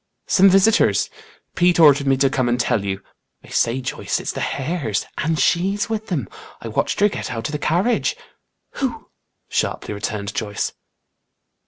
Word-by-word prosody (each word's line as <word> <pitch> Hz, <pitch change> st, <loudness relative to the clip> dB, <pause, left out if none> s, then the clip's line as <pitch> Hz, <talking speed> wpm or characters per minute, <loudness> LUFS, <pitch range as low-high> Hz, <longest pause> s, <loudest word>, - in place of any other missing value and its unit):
"Some 195 Hz, +1 st, +5 dB
visitors. 195 Hz, +4 st, +3 dB, 0.4 s
Pete 175 Hz, 0 st, +3 dB
ordered 145 Hz, -3 st, +6 dB
me 135 Hz, -1 st, +3 dB
to 135 Hz, 0 st, +3 dB
come 130 Hz, -3 st, +1 dB
and 120 Hz, +1 st, 0 dB
tell 110 Hz, -3 st, +1 dB
you. 95 Hz, -1 st, -3 dB, 0.4 s
I -, -, -15 dB
say, 120 Hz, +3 st, +1 dB
Joyce, 125 Hz, -, -2 dB
it's -, -, -3 dB
the -, -, -6 dB
Hares. 140 Hz, -, -2 dB
And 160 Hz, +1 st, 0 dB
she's 195 Hz, +9 st, +1 dB
with 220 Hz, 0 st, -3 dB
them. 140 Hz, -, -2 dB, 0.3 s
I -, -, -7 dB
watched -, -, -1 dB
her 205 Hz, -, +7 dB
get 210 Hz, -, -5 dB
out 115 Hz, +1 st, -4 dB
of -, -, -5 dB
the 150 Hz, -, -3 dB
carriage." 180 Hz, +11 st, +1 dB, 0.6 s
"Who?" 265 Hz, -3 st, -3 dB, 0.4 s
sharply -, -, -2 dB
returned 100 Hz, 0 st, -4 dB
Joyce. 105 Hz, -2 st, -3 dB
145 Hz, 165 wpm, -21 LUFS, 115-185 Hz, 0.6 s, her